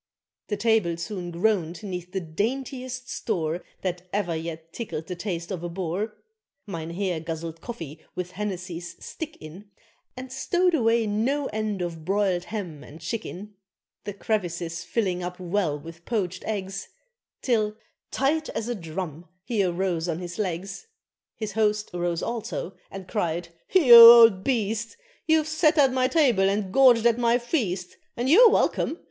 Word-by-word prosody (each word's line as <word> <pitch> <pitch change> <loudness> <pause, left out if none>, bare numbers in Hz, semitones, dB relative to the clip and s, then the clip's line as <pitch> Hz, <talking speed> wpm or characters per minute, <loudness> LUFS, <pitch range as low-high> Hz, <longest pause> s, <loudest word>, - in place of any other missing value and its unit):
The 210 - -2
table 210 -6 +2
soon 180 0 -5
groaned 175 0 0
'neath 180 -3 -6
the 190 - -1
daintiest 255 - -3
store 170 -9 -2 0.2
That 180 -1 -4
ever 190 -5 -1
yet 160 0 -6
tickled 165 -9 -5
the 180 - -5
taste 175 -1 -4
of 180 -3 -3
a 175 - -3
Boer 190 +5 -3 0.5
Mynheer 170 -1 -3
guzzled 165 0 -6
coffee 165 - -7 0.2
with 180 0 -4
Hennessy's 180 -3 -5
"stick" 320 -1 -7
in, 180 +7 -11 0.5
And 255 0 -7
stowed 350 +7 +1
away 230 -5 +3
no 240 +8 0
end 215 -3 -2
of 165 -2 -5
broiled 190 -1 0
ham 180 -9 -6
and 155 - -12
chicken; 210 -2 -6 0.5
The 205 - -4
crevices 170 -6 -2
filling 185 -2 -1
up 180 +1 -5
well 180 -4 0
with 165 +3 -11
poached 185 -5 -2
eggs, 195 -2 -4 0.6
Till, 215 -4 +1 0.3
tight 305 +4 0
as 225 - -4
a 245 - -1
drum, 165 -3 -6 0.2
he 215 -1 0
arose 175 -2 -1
on 160 - -1
his 175 +2 -7
legs 195 - -4 0.5
His 215 -2 -4
host 210 0 0
arose 175 -1 -1
also 225 -5 -4
and 190 -1 -9
cried, 175 -5 -2 0.2
"You 310 -11 +7
old 230 -4 +11
beast! 225 -2 -1 0.3
You've 315 -1 +3
sat 310 0 +2
at 270 -3 +5
my 255 -1 +2
table 250 -11 +3
and 200 -1 -2
gorged 245 -4 +6
at 235 0 +4
my 235 0 +3
feast! 210 - -2 0.2
And 250 +3 0
you're 460 +7 +9
welcome. 335 - +1
195 Hz, 155 wpm, -25 LUFS, 175-230 Hz, 0.6 s, old